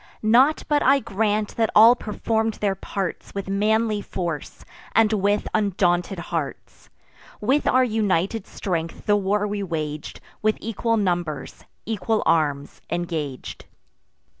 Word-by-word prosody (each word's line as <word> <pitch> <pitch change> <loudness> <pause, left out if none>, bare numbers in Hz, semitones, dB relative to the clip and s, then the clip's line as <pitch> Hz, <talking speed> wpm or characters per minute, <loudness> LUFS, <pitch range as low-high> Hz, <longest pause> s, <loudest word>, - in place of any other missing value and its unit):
Not 250 +8 +4
but 295 -1 +2
I 275 +1 +5
grant 210 -2 -1
that 225 -2 +2
all 225 +3 +8
perform'd 220 0 -1
their 200 -2 0
parts 195 0 -5
With 200 -1 -4
manly 215 +2 +1
force, 170 -7 -5 0.3
and 225 -1 +4
with 205 0 +1
undaunted 190 -3 +1 0.2
hearts: 155 -5 -5 0.5
With 265 +8 +1
our 255 0 +4
united 210 -3 0
strength 165 -4 -4
the 205 - +4
war 205 +1 +1
we 205 0 -3
wag'd; 155 -5 -4 0.2
With 215 0 +2
equal 230 +1 -1
numbers, 175 -7 -2 0.2
equal 220 0 -1
arms, 145 -3 0
engag'd. 160 -6 -4
205 Hz, 125 wpm, -23 LUFS, 175-220 Hz, 0.5 s, all